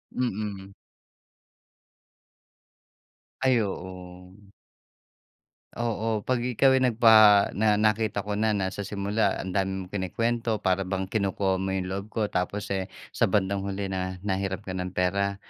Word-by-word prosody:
Mm. 100 Hz, -5 st, -3 dB, 2.7 s
Ay, 130 Hz, -3 st, +3 dB
oo. 90 Hz, 0 st, -8 dB, 1.3 s
Oo, 115 Hz, -2 st, -1 dB
'pag 130 Hz, -1 st, 0 dB
ikaw 125 Hz, +2 st, +3 dB
ay -, -, -3 dB
nagpaha 110 Hz, -3 st, +6 dB
na 105 Hz, 0 st, +2 dB
nakita 110 Hz, -1 st, +1 dB
ko 105 Hz, 0 st, -3 dB
na, 110 Hz, -1 st, +2 dB
na 95 Hz, -2 st, -1 dB
sa 100 Hz, 0 st, -5 dB
simula 100 Hz, 0 st, 0 dB
ang 95 Hz, -, -5 dB
dami 95 Hz, 0 st, -1 dB
mong 90 Hz, -, -14 dB
kinukwento, 115 Hz, +3 st, -1 dB
para 95 Hz, 0 st, +1 dB
bang 95 Hz, 0 st, -2 dB
kinukuha 95 Hz, -2 st, 0 dB
mo 95 Hz, 0 st, -2 dB
yung 95 Hz, -1 st, -3 dB
loob 100 Hz, +1 st, -4 dB
ko, 110 Hz, +1 st, -4 dB
tapos 100 Hz, +3 st, -2 dB
eh, 95 Hz, -1 st, -1 dB, 0.2 s
sa -, -, +1 dB
bandang 100 Hz, 0 st, +1 dB
huli 100 Hz, 0 st, -3 dB
na 95 Hz, 0 st, -3 dB
nahiram 95 Hz, -1 st, -2 dB
ka 95 Hz, -, -6 dB
ng 90 Hz, 0 st, -5 dB
pera 100 Hz, +2 st, 0 dB
100 Hz, 140 wpm, -26 LUFS, 95-110 Hz, 2.7 s, nagpaha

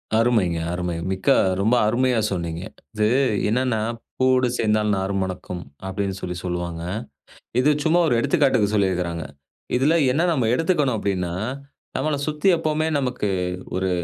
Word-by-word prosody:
அருமைங்க, 110 Hz, -7 st, +2 dB, 0.2 s
அருமை! 90 Hz, -1 st, -2 dB, 0.2 s
மிக்க 95 Hz, -, -1 dB, 0.3 s
ரொம்ப 110 Hz, +5 st, +3 dB
அருமையா 125 Hz, +1 st, +2 dB
சொன்னீங்க. 85 Hz, -2 st, -3 dB, 0.3 s
இது 105 Hz, 0 st, +2 dB, 0.4 s
என்னன்னா, 125 Hz, -1 st, +1 dB, 0.4 s
“பூவோடு 130 Hz, -1 st, +3 dB
சேர்ந்தால் 105 Hz, -1 st, +2 dB
நாரும் 95 Hz, 0 st, -1 dB
மணக்கும்” 90 Hz, -1 st, -5 dB, 0.2 s
அப்படின்னு 95 Hz, 0 st, -2 dB
சொல்லி 90 Hz, -1 st, -4 dB
சொல்வாங்க. 85 Hz, -2 st, -3 dB, 0.8 s
இது 140 Hz, -, +4 dB
சும்மா 170 Hz, +2 st, +3 dB
ஒரு 125 Hz, -, +2 dB
எடுத்துக்காட்டுக்கு 125 Hz, -, +2 dB
சொல்லிருக்குறாங்க. 90 Hz, -5 st, 0 dB, 0.5 s
இதில 145 Hz, +5 st, +3 dB, 0.2 s
என்ன 160 Hz, +7 st, +2 dB
நம்ம 130 Hz, -8 st, +1 dB
எடுத்துக்கணும் 150 Hz, -6 st, +1 dB
அப்படின்னா, 90 Hz, -4 st, -1 dB, 0.6 s
நம்மள 155 Hz, -1 st, 0 dB
சுத்தி 150 Hz, +4 st, -1 dB
எப்பவுமே 155 Hz, 0 st, 0 dB
நமக்கு 125 Hz, -6 st, -1 dB, 0.5 s
ஒரு 95 Hz, 0 st, 0 dB
110 Hz, 130 wpm, -23 LUFS, 95-130 Hz, 0.8 s, இது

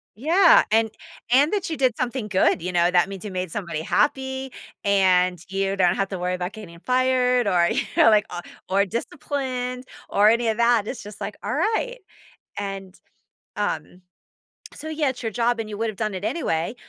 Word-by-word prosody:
Yeah, 335 Hz, -, +5 dB
and 220 Hz, 0 st, +2 dB, 0.4 s
and 280 Hz, +5 st, +5 dB
that 400 Hz, -4 st, -1 dB
you 320 Hz, -, -3 dB
did 255 Hz, -4 st, +1 dB
something 245 Hz, -2 st, -2 dB
good, 190 Hz, -4 st, +2 dB
you 180 Hz, +2 st, -3 dB
know, 175 Hz, 0 st, +2 dB
that 180 Hz, +1 st, +3 dB
means 195 Hz, 0 st, -8 dB
you 205 Hz, -, -5 dB
made 185 Hz, -2 st, -4 dB
somebody 170 Hz, -5 st, -4 dB
happy, 265 Hz, -, 0 dB, 0.3 s
and 185 Hz, -3 st, +3 dB
you 195 Hz, 0 st, -1 dB
don't 180 Hz, -2 st, +3 dB
have 195 Hz, -1 st, -1 dB
to 190 Hz, -, -5 dB
worry 180 Hz, +1 st, -1 dB
about 180 Hz, +1 st, -4 dB
getting 175 Hz, -6 st, -11 dB
fired, 250 Hz, +1 st, +2 dB
or 175 Hz, -3 st, +3 dB
you -, -, +1 dB, 0.2 s
know, -, -, +7 dB
like, 210 Hz, -1 st, +4 dB
or -, -, -4 dB, 0.3 s
or 200 Hz, +1 st, +3 dB
disciplined, 255 Hz, +2 st, -4 dB, 0.2 s
or 205 Hz, +1 st, +5 dB
any 230 Hz, +1 st, +2 dB
of 220 Hz, -, -1 dB
that, 235 Hz, -2 st, +3 dB
it's 245 Hz, 0 st, -5 dB
just, 210 Hz, 0 st, -11 dB
like, -, -, -5 dB
all -, -, -2 dB
right, -, -, 0 dB, 0.6 s
and, 195 Hz, -2 st, -6 dB, 0.6 s
um, 180 Hz, -, -3 dB, 0.7 s
so 310 Hz, +2 st, -7 dB
yeah, 305 Hz, -3 st, 0 dB
it's 250 Hz, -1 st, -6 dB
your 225 Hz, -2 st, -3 dB
job 235 Hz, +1 st, 0 dB
and 220 Hz, -1 st, -4 dB
you 210 Hz, -, -6 dB
would 225 Hz, +1 st, -1 dB
have 210 Hz, -, -8 dB
done 215 Hz, -2 st, -2 dB
it 185 Hz, -, -6 dB
anyway, 215 Hz, -, -1 dB
215 Hz, 195 wpm, -23 LUFS, 190-255 Hz, 0.7 s, know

